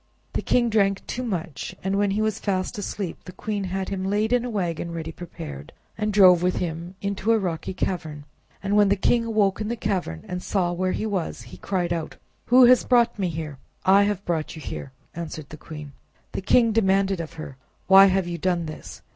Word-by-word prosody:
The - - -1
king 240 -2 +2
drank 195 -2 +2
too 250 - -4
much, 175 - -4
and 190 +1 0
when 205 0 +2
he 210 +2 0
was 215 -1 -1
fast 195 +2 -2
asleep, 195 -3 -5
the 180 - -8
queen 205 +1 -3
had 190 +1 -3
him 190 -1 -3
laid 210 +4 +1
in 245 -1 +3
a 250 - -3
wagon 175 -6 -2
ready 165 -1 -5
prepared, 75 - -9 0.2
and 215 0 -1
drove 185 -4 +7
with 180 0 +1
him 170 +1 -4
into 200 +2 0
a 225 - +5
rocky 180 -2 -3
cavern. 155 -6 -3 0.4
And 200 +1 0
when 205 -1 +5
the 200 - +4
king 230 +4 +2
awoke 215 -3 +1
in 210 - -2
the 235 - -1
cavern, 185 - -3
and 180 0 -4
saw 180 -3 0
where 185 +1 0
he - - -2
was, 195 -6 -3
he - - -12
cried 175 -3 -1
out— 165 -2 -4 0.3
"Who 250 +1 +7
has 250 +1 +6
brought 235 -3 +3
me 185 -2 0
here?" 155 -4 -6 0.3
"I 195 +2 +6
have 205 -1 -2
brought 165 -2 -2
you 160 - -9
here," 135 - -6 0.2
answered 160 -3 -6
the - - -8
queen. 150 -2 -9 0.4
The - - -4
king 230 +4 +4
demanded 195 -3 +2
of 160 - -8
her: 155 -4 -8 0.3
"Why 195 0 +8
have 190 -1 +1
you 175 -1 -4
done 175 -1 0
this? 155 - -9
190 Hz, 215 wpm, -24 LUFS, 170-210 Hz, 0.4 s, Why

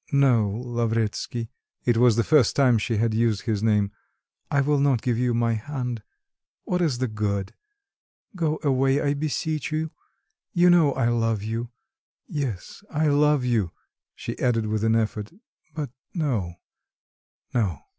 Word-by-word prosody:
"No, 130 -7 +4
Lavretsky 115 0 -2 0.3
(it 120 - +3
was 120 -1 +5
the 115 - +2
first 145 -3 +4
time 125 -5 +4
she 115 +1 -1
had 115 +1 +1
used 110 -2 +1
this 110 -4 0
name), 105 -2 +2 0.6
I 140 - +2
will 145 +1 +2
not 140 -5 +2
give 125 -2 +1
you 125 -1 +1
my 115 0 +2
hand. 125 0 -4 0.6
What 180 0 -1
is 150 -8 +1
the 130 +1 0
good? 100 -3 -2 0.8
Go 155 -3 0
away, 135 -1 +2
I 140 -1 +1
beseech 155 +1 -2
you. 155 0 -2 0.6
You 175 0 +5
know 160 -5 +5
I 125 -3 +1
love 115 -3 0
you... 115 +2 -3 0.6
yes, 135 - -5
I 155 -1 +1
love 145 -2 +3
you," 110 -8 0 0.4
she - - -6
added 115 -3 +1
with 110 0 -1
an 110 0 +3
effort; 110 -2 -1 0.4
"but 145 -5 -4 0.2
no... 115 - -1 1.0
no." 95 - 0
120 Hz, 150 wpm, -25 LUFS, 110-145 Hz, 1.0 s, was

